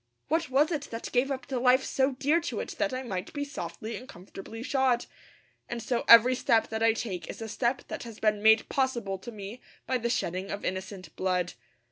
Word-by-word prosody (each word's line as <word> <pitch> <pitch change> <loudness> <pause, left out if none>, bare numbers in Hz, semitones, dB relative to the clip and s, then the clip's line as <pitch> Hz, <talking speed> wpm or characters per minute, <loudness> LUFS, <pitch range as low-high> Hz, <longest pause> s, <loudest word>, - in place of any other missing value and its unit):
What 325 -1 +1
was 290 +5 +3
it 295 -3 -2
that 230 0 -6
gave 255 +2 +2
up 265 -2 -3
the 265 -3 -2
life 255 +1 +4
so 265 0 +1
dear 285 +6 +2
to - - -3
it - - -4
that 300 -2 +1
I 255 0 -3
might 190 -6 -4
be 285 -1 -2
softly 215 -3 -6
and 255 +2 -11
comfortably 195 +5 -9
shod? 260 -3 +2 0.6
And 235 - -3
so 240 +1 -1
every 235 +2 +9
step 230 -3 +2
that 220 0 -3
I 225 0 +5
take 205 -6 -4
is - - -7
a 225 - -5
step 240 +3 -1
that - - -5
has 230 -3 -9
been 210 -1 +2
made 220 +1 +5
possible 235 -8 -1
to 240 - -8
me 210 +3 -8 0.2
by 255 -1 0
the 235 0 -1
shedding 185 -5 -1
of 200 - -4
innocent 190 -2 -5
blood. 180 -2 0
235 Hz, 215 wpm, -29 LUFS, 205-260 Hz, 0.6 s, every